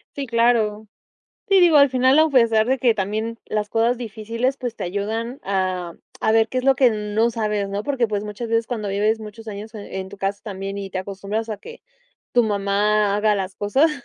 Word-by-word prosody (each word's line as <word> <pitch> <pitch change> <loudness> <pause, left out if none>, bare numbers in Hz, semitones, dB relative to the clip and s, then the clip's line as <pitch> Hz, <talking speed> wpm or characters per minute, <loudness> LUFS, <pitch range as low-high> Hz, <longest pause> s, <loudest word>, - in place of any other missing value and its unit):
Sí, 280 - -3
claro. 230 -3 +1 0.6
Sí, 390 - +5
digo, 340 -3 +6
al 280 -1 +6
final 260 +2 +4
a 320 - +4
pesar 230 -5 +4
de 265 +2 +1
que 235 -2 +3
también 220 +3 -3
las 210 -1 -2
cosas 230 +3 +1
difíciles 230 +3 -2
pues 245 -4 -5
te - - -4
ayudan 220 +7 -3
a 185 -3 -2 0.3
a 220 - +3
ver 225 0 +4
qué 255 - -2
es 255 - -3
lo 270 0 +5
que 250 -1 +5
no 215 +2 0
sabes 210 -3 -1
¿no? 200 +1 -2
Porque 250 -1 0
pues 210 -1 -2
muchas 210 +3 -6
veces 230 0 +1
cuando 220 -4 -3
vives 210 +3 +1
muchos 220 +1 -10
años 215 +2 -8
e 205 -2 -7
en 190 - -7
tu - - -10
casa 195 +1 -2
también 195 -1 -5
y 195 -1 -5
te 185 - -3
acostumbras 200 +4 -4
a 215 - -3
que 465 - -12 0.5
tu 245 - +4
mamá 205 0 +1
haga 210 0 +2
las 190 -1 -3
cosas, 265 +10 +2
220 Hz, 215 wpm, -22 LUFS, 205-235 Hz, 0.6 s, digo